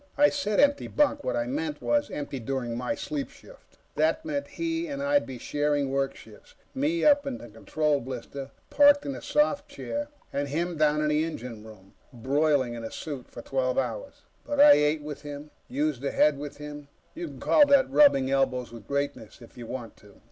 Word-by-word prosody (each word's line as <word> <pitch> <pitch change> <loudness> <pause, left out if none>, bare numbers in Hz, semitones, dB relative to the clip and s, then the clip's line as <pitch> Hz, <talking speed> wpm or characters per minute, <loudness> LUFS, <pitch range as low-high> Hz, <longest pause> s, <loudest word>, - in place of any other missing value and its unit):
I 290 +1 +6
said 245 -8 -1
empty 285 0 +3
bunk. 290 -1 +1
What - - -1
I 295 0 0
meant 300 +3 -3
was, 290 0 +1
empty 140 -2 -5
during 120 -1 -3
my 125 +1 -2
sleep 145 -2 -4
shift. - - -18 0.2
That 160 - +1
meant 285 -2 -3
he 330 +3 -3
and 280 -2 -5
I'd 285 +1 +2
be 130 - -7
sharing 145 +1 -1
work 135 0 0
shifts 110 -2 -16 0.2
me 300 +5 0
up 285 -1 +5
in 270 - -3
the 120 - -11
control 145 +7 0
blister, 135 +2 -7 0.2
parked 285 0 +6
in 280 - -3
a - - -8
soft 300 -1 +1
chair, 290 +1 -4 0.3
and 140 0 -1
him 170 +5 -2
down 150 0 +2
in 150 - +1
the 150 +1 +2
engine 125 -9 -6
room, 105 -3 -15 0.2
broiling 135 +1 +1
in 115 -1 -7
a 115 - -4
suit 140 -2 -7
for - - -10
twelve 130 -1 -1
hours. 115 -5 -3 0.2
But 290 -1 -3
I 290 +1 +9
ate 150 - +3
with 150 -1 -7
him, 145 0 -8 0.2
used 145 -1 -1
the 140 - -1
head 150 0 +3
with 145 0 -7
him; 150 0 -9 0.3
you 340 +1 -5
can - - -11
call 295 -2 +5
that 280 -1 +5
rubbing 135 - +5
elbows 130 -3 0
with 115 -1 -12
greatness, 140 -5 -3
if 115 - -15
you 120 -2 -9
want 120 -3 -7
to. 100 -1 -19
150 Hz, 205 wpm, -27 LUFS, -, 0.3 s, I